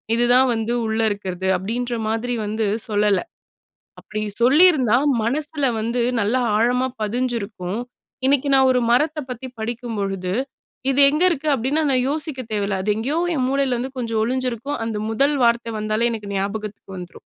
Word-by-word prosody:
இது 240 +1 +2
தான் 260 +1 +5
வந்து 225 +1 -1
உள்ள 220 0 -1
இருக்கறது" 190 -2 -4
அப்டின்ற 240 +6 -3 0.2
மாதிரி 225 +3 -1
வந்து 215 +1 -1 0.2
சொல்லல. 205 -1 +2 0.8
அப்டி 215 0 -5 0.2
சொல்லியிருந்தா 265 -3 +5 0.3
மனசுல 290 +4 -1 0.2
வந்து 235 +2 -1 0.2
நல்ல 210 +5 +1 0.2
ஆழமா 250 +3 +2
பதிஞ்சிருக்கும். 215 -4 -2 0.5
இன்னைக்கு 280 +1 +2
நான் 265 0 +5
ஒரு 250 - +2
மரத்த 300 +5 +2
பத்தி 250 +1 -6
படிக்கும் 230 0 -4
பொழுது, 195 -2 -2 0.6
"இது 275 - +1
எங்க 300 +5 +1
இருக்கு" 310 -2 -2
அப்படின்னா 270 +6 0
நான் 255 -1 +2
யோசிக்க 295 -2 -2
தேவையில்ல. 200 -2 -1
அது 210 +1 +2
எங்கயோ 280 +9 -1 0.2
என் 255 - 0
மூளையில 275 -2 +1
வந்து 265 +2 -5
கொஞ்சம் 225 -2 -1
ஒளிஞ்சிருக்கும். 255 +2 -2
அந்த 220 -2 -3
முதல் 280 +6 +2
வார்த்த 235 -1 +1
வந்தாலே 215 +2 0
எனக்கு 210 -3 -6
ஞாபகத்துக்கு 200 0 -4
வந்துரும். 180 0 -9
235 Hz, 150 wpm, -21 LUFS, 215-260 Hz, 0.8 s, தான்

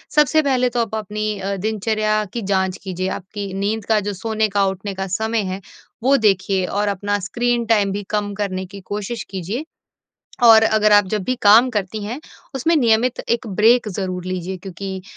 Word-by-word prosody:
सबसे 300 +1 +4
पहले 255 -4 +1
तो 240 0 0
आप 225 -1 -3
अपनी 215 0 -3
अ, 195 +1 -2
दिनचर्या 215 +1 0
की 235 - -3
जाँच 190 -2 0
कीजिए, 185 -1 -3
आपकी 195 +1 -6
नींद 200 +2 -2
का 220 -1 +3
जो 205 0 -3
सोने 220 +2 -1
का, 200 0 +2
उठने 195 +1 -3
का 190 0 -4
समय 220 +4 -1
है 190 +1 -5 0.4
वो 270 +2 +5
देखिए 195 -4 +2
और 205 +3 -1
अपना 205 +1 -1
स्क्रीन 240 +4 -1
टाइम 210 -3 +2
भी 205 +1 -3
कम 205 -1 -1
करने 190 -2 -3
की 200 +2 -11
कोशिश 210 +3 -4
कीजिए। 195 - -4 0.8
और 225 -2 +8
अगर 215 -1 +3
आप 205 -1 +6
जब 210 0 -1
भी 255 - 0
काम 220 +5 +7
करती 210 -1 -3
हैं 235 +7 -5 0.3
उसमें 295 +6 +1
नियमित 235 -2 +2
एक 235 +1 0
ब्रेक 225 +4 +3
ज़रूर 185 -2 -4
लीजिए। 185 0 -4
क्योंकि 190 0 -6
210 Hz, 185 wpm, -20 LUFS, 195-225 Hz, 0.8 s, और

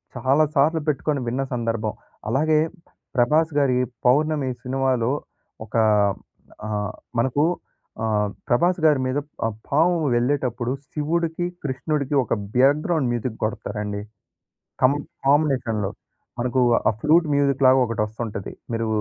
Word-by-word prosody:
చాలా 135 +5 +3
సార్లు 155 +4 +3
పెట్టుకొని 150 0 0
విన్న 125 +3 -1
సందర్భం, 115 -3 -1 0.4
అలాగే 155 +5 +3 0.6
'ప్రభాస్' 150 +5 +2
గారి 130 -3 +2 0.3
'పౌర్ణమి' 145 +1 +2
సినిమాలో 130 -2 0 0.5
ఒక 110 - -11 0.9
ఆహ్, 105 -1 -2 0.3
మనకు 130 +5 +2 0.6
ఆహ్, 105 -2 +1 0.2
'ప్రభాస్' 170 +7 +2
గారి 150 -4 +5
మీద 130 +2 -1 0.3
ఆ - - +3 0.2
పాము 165 +5 +3 0.2
వెళ్ళేటప్పుడు 125 -1 0 0.2
శివుడికి, 165 +3 -1 0.2
కృష్ణుడికి 140 +1 -2
ఒక - - -2 0.2
బ్యాక్‌గ్రౌండ్ 145 +2 +3
మ్యూజిక్ 120 -1 -3
కొడతారండి. 105 -1 -3 0.8
కం 130 +2 +6 0.3
కాంబినేషన్‌లో 130 -8 +2 0.5
మనకు 125 +1 +1 0.3
ఆ - - +3
ప్లూట్ 160 +3 +4
మ్యూజిక్‌లాగా 135 -2 +4
ఒకటొస్తుంటది. 110 -2 -4 0.2
మీరు 115 0 -1
130 Hz, 105 wpm, -23 LUFS, 115-150 Hz, 0.9 s, కం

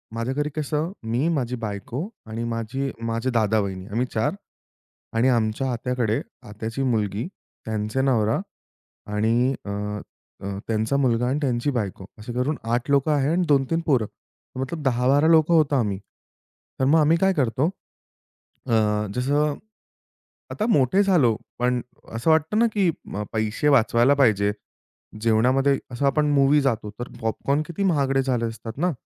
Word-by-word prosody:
माझ्या 115 +3 -2
घरी 150 +2 -1
कसं 155 +2 -1
मी, 120 +7 0
माझी 125 -3 -1
बायको 115 - -4 0.2
आणि 110 +1 -4
माझी 115 +4 -3
माझे 115 +2 -1
दादा, 110 -2 +2
वहिनी 95 -2 -3
आम्ही 115 +4 -1
4 110 +8 +1 0.8
आणि 120 +3 +4
आमच्या 120 +2 +1
आत्याकडे 120 +1 -1 0.3
आत्याची 110 +5 -4
मुलगी 110 - 0 0.4
त्यांचे 110 +3 -1
नवरा 115 -5 +2 0.7
आणि 115 +5 +2
अ, - - -6 0.7
अ, 100 0 -4
त्यांचा 110 +4 0
मुलगा 125 -3 +2
आणि 140 +3 0
त्यांची 130 0 0
बायको 100 -6 -3
असे 115 +3 -7
धरून 130 +5 -1 0.2
8 120 +3 -1
लोकं 140 +2 +3
आहेत 145 0 +1
आणि 175 +2 +1
2-3 140 +2 +2
पोरं. 130 -7 +3 0.5
मतलब 135 +5 -3
10-12 135 +4 +3
लोकं 160 0 +5
होतो 150 -3 +3
आम्ही. 105 -7 0 0.8
तर 130 - +2
मग 155 +4 +5
आम्ही 155 +2 +4
काय 190 +2 +3
करतो. 135 -1 +1 1.0
अ, 105 -2 +2
जसं, 145 +3 +1 1.0
आता 215 - -2
मोठे 170 - +4
झालो, 155 - +3 0.2
पण 125 0 +1 0.3
असं 115 +7 0
वाटतं 160 +6 +2
ना, 235 - +5
अ, - - +2
की 195 -4 +2 0.4
पैसे 110 +5 0
वाचवायला 120 0 +4
पाहिजे. 105 -7 +3 0.7
जेवणामध्ये 130 +5 +3
असं. 125 +4 -2
आपण 150 +1 +2
मूव्ही 140 +1 +4
जातो, 115 -6 -1
तर 120 - -5
पॉपकॉर्न 135 +6 0
किती 170 +3 -3
महागडे 140 -7 +2
झाले 125 -3 0
असतात 115 +1 -7
ना, 175 +3 +1
125 Hz, 150 wpm, -24 LUFS, 115-145 Hz, 1.0 s, लोकं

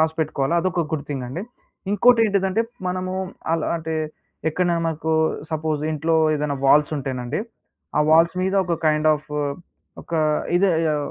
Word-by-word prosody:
రాసిపెట్టుకోవాల, 160 -2 0
అదొక 170 -2 0
గుడ్ 150 -3 -2
థింగండి. 135 +4 -4 0.5
ఇంకోటేంటిదంటే, 205 -2 +3 0.3
మనమూ 185 +1 -2 0.4
అలా 165 -1 0
అంటే, 160 -1 -4 0.5
ఎక్కడ్నైనా 170 0 0
మనకూ 160 0 -1 0.4
సపోజ్ 155 -1 -1
ఇంట్లో, 160 +2 0 0.2
ఏదన్నా 145 -1 -1
వాల్సుంటేనండీ, 135 -2 +1 0.6
ఆ - - +5
వాల్స్ 165 +2 +5
మీద 190 +1 0
ఒక 175 -1 0
కైండ్ 155 0 +3
ఆఫు, 150 0 -8 0.7
ఒకా 165 -2 -1 0.4
ఇదే, 190 +1 +3 0.2
ఆహ్, 145 -1 -3
160 Hz, 125 wpm, -22 LUFS, 150-180 Hz, 0.7 s, ఆ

